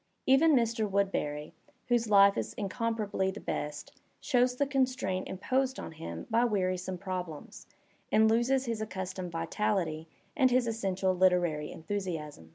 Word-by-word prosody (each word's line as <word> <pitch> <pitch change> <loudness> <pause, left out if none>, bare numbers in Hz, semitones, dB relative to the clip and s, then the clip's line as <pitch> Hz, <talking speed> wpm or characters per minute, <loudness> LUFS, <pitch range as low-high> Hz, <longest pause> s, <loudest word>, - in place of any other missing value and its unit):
Even 285 +4 +5
Mr. 230 -3 +1
Woodbeny, 160 -7 -1 0.4
whose 240 -2 +1
life 200 -1 +7
is - - -3
incomparably 210 -2 -1
the 195 +2 -6
best, 150 0 -4 0.3
shows 250 -1 +2
the 285 - +1
constraint 255 -9 0
imposed 260 +7 -1
on - - -6
him 160 0 -7
by 230 0 +2
wearisome 185 -4 -1
problems, 180 -4 -6 0.4
and 220 0 +5
loses 240 +4 +2
his 230 -2 -3
accustomed 185 -3 -5
vitality 165 -1 -1 0.3
and 265 -5 +4
his 250 0 +3
essential 195 -4 0
literary 175 -5 +2
enthusiasm. 160 - -5
200 Hz, 135 wpm, -30 LUFS, 180-235 Hz, 0.4 s, life